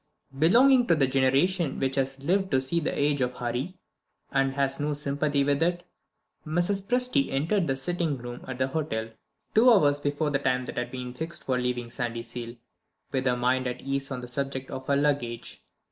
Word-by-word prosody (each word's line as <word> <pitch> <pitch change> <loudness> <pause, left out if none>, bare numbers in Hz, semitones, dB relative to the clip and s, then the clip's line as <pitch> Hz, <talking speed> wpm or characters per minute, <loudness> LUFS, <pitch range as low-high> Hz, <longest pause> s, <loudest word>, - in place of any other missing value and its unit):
Belonging 245 - +5
to 170 - +5
the 140 -3 +3
generation 135 +5 +2
which 135 0 0
has 135 0 -2
lived 190 +4 +1
to 130 - +3
see 135 +6 0
the 155 - -2
Age 145 -1 +2
of 125 0 0
Hurry, 125 +10 -3 0.5
and 135 -1 +2
has 140 0 0
no 145 0 -1
sympathy 145 0 0
with 140 +1 +1
it, 175 +1 +1 0.6
Mrs. 175 +5 0
Presty 245 - +1
entered 165 +7 +1
the 135 - +1
sitting 160 +1 -1
room 120 0 -8
at 130 -1 -5
the 130 +1 0
hotel, 115 -7 -2 0.4
two 230 +4 +6
hours 145 -10 +4
before 145 +1 -1
the 140 - +1
time 130 -2 +1
that 125 - -4
had 120 0 -3
been 125 -1 -6
fixed 160 +6 -5
for 130 -1 0
leaving 125 -1 -2
Sandyseal, 120 0 -5 0.5
with 130 -1 0
her 125 0 +2
mind 130 +1 +1
at 125 0 -4
ease 135 0 -2
on 130 -2 -4
the 125 - -7
subject 135 +1 -4
of 130 - -6
her 140 - +3
luggage. 140 -5 -1
135 Hz, 190 wpm, -27 LUFS, 125-155 Hz, 0.6 s, two